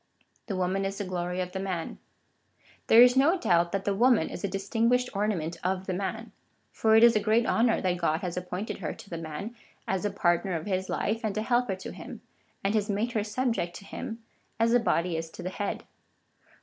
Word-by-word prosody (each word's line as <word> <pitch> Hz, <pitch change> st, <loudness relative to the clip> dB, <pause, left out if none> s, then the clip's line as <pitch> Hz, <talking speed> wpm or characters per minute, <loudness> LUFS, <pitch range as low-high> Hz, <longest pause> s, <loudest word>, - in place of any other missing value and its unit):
The 200 Hz, -, -2 dB
woman 185 Hz, +1 st, 0 dB
is 195 Hz, 0 st, -3 dB
the 205 Hz, -, -3 dB
glory 180 Hz, 0 st, -2 dB
of 180 Hz, 0 st, -4 dB
the 190 Hz, -, -4 dB
man. 185 Hz, -4 st, -4 dB, 0.9 s
There 230 Hz, +2 st, +9 dB
is 250 Hz, 0 st, +5 dB
no 295 Hz, +8 st, +4 dB
doubt 170 Hz, -, +2 dB
that 195 Hz, -1 st, -2 dB
the 200 Hz, -, +1 dB
woman 235 Hz, -3 st, +3 dB
is -, -, -7 dB
a -, -, +1 dB
distinguished 230 Hz, +6 st, +1 dB
ornament 175 Hz, -5 st, -1 dB
of 185 Hz, +1 st, -1 dB
the 185 Hz, -, -2 dB
man; 200 Hz, +5 st, -4 dB, 0.4 s
for 220 Hz, 0 st, +3 dB
it 225 Hz, -, +7 dB
is 235 Hz, -1 st, +7 dB
a -, -, +4 dB
great 220 Hz, +3 st, +2 dB
honour 230 Hz, 0 st, +2 dB
that 180 Hz, -2 st, 0 dB
God 160 Hz, -1 st, +1 dB
has 175 Hz, -2 st, -3 dB
appointed 180 Hz, +3 st, -4 dB
her -, -, -3 dB
to -, -, -14 dB
the 170 Hz, -, -4 dB
man 165 Hz, +9 st, -6 dB, 0.3 s
as 190 Hz, -1 st, 0 dB
the 205 Hz, -, 0 dB
partner 180 Hz, -1 st, +1 dB
of 160 Hz, -, -4 dB
his 190 Hz, -2 st, -2 dB
life, 225 Hz, +2 st, -1 dB
and 215 Hz, -1 st, -2 dB
a 215 Hz, -, 0 dB
helper 240 Hz, -4 st, +1 dB
to 190 Hz, -, -8 dB
him,^ -, -, -9 dB, 0.4 s
and 195 Hz, +1 st, +1 dB
has 215 Hz, -1 st, 0 dB
made 210 Hz, +4 st, 0 dB
her 220 Hz, -3 st, 0 dB
subject 220 Hz, -5 st, -1 dB
to 200 Hz, -, -10 dB
him 225 Hz, +2 st, -7 dB, 0.4 s
as 230 Hz, +1 st, +3 dB
the 245 Hz, -, +5 dB
body 175 Hz, -6 st, 0 dB
is 165 Hz, 0 st, -4 dB
to -, -, -10 dB
the 180 Hz, -, -2 dB
head. 200 Hz, +1 st, -3 dB
195 Hz, 220 wpm, -28 LUFS, 180-225 Hz, 0.9 s, There